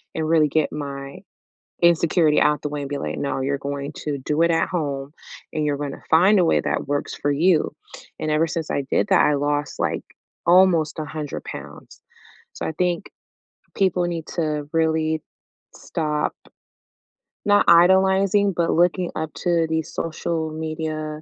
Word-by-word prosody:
and 160 -1 -1
really 160 -2 +4
get 155 +1 0
my 140 -2 -6 0.6
insecurity 170 -2 +4
out 150 0 +2
the 150 - -3
way 145 0 -4
and 140 - -5
be 145 - -3
like, 75 0 -4
"No, 140 -1 -2
you're 140 +1 -1
going 140 +1 -5
to 145 -2 -2
do 150 +4 -1
it 170 - +3
at 165 0 +1
home, 140 -5 -3 0.4
and 155 -1 -1
you're 145 -1 0
gonna 145 -1 -5
find 185 +6 +6
a 180 - +4
way - - +3
that - - -2
works 145 0 -2
for 145 - -1
you." 160 +3 +2 0.5
And 155 - -2
ever 155 +2 +3
since 165 -1 -4
I 140 - -1
did - - +2
that, 190 -3 +5
I 150 - +3
lost, 145 +1 -2
like, - - -1 0.4
almost 170 -3 +4
100 150 -1 -5
pounds. - - -10 0.5
So, - - -5
I - - -3
think 175 +1 -1 0.7
people 185 -2 +1
need 170 -2 -4
to 150 -3 -2
really 160 -1 +1 0.5
stop 150 -2 -2 1.1
not 205 0 +4
idolizing, 190 +3 +5
but 170 -1 0
looking 175 +1 +2
up 155 0 -4
to 170 -2 +1
these 160 -1 -2
social 160 0 -3
media, 155 -1 -4
155 Hz, 165 wpm, -22 LUFS, 150-170 Hz, 1.1 s, find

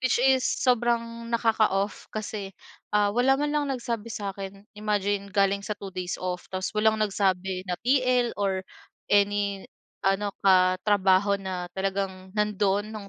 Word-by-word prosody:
which 255 - +2
is 265 0 +4
sobrang 235 -2 0
nakaka-off 220 -3 +1
kasi, 210 -2 -5 0.4
ah, 205 -1 +4
wala 255 +3 +3
man 295 - 0
lang 295 -1 +1
nagsabi 235 -3 -4
sa 200 -2 -4
akin. 195 0 -8
Imagine, 205 -1 -1
galing 200 0 +2
sa 210 - -3
2 195 -1 -8
days 180 -1 -3
off 180 -1 -4
tapos 185 0 -2
walang 220 0 +3
nagsabi 190 -2 0
na 180 - 0
TL 255 -1 +2
or 195 -2 0 0.5
any 200 -1 +2 0.4
ano 195 +1 +1
katrabaho 190 +1 +4
na 185 -2 -4
talagang 190 -1 -3
nando'n 210 0 +1
no'ng 205 -2 -8
205 Hz, 140 wpm, -26 LUFS, 195-220 Hz, 0.5 s, is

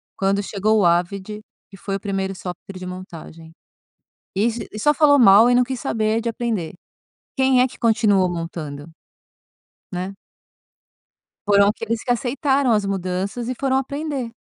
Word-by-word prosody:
quando 195 +1 0
chegou 215 +2 +1
o 195 - +3
Avid, 190 +5 0 0.3
que 195 - -14
foi 195 +1 -4
o - - -3
primeiro 195 -1 -3
software 185 +1 -8
de 185 - -7
montagem. 165 -3 -10 0.9
E 205 +3 +2 0.3
e 215 - -7
só 295 +8 +3
falou 285 -1 +5
mal 220 -1 +7
e - - +4
não 250 - +5
quis 260 +1 -3
saber 220 -3 0
de 235 - -3
aprender. 225 -7 -3 0.6
Quem 265 -2 +3
é 250 - +5
que 255 - -11
continuou 215 -5 +3
montando, 165 -3 -6 1.0
né. 185 +2 -4 1.3
Foram 200 0 +5
aqueles 225 +1 -2
que - - -4
aceitaram 265 +2 +1
as 210 -2 +1
mudanças 195 +4 -3
e - - -2
foram 265 +1 0
aprender. 275 -2 -3
210 Hz, 155 wpm, -21 LUFS, 185-245 Hz, 1.3 s, mal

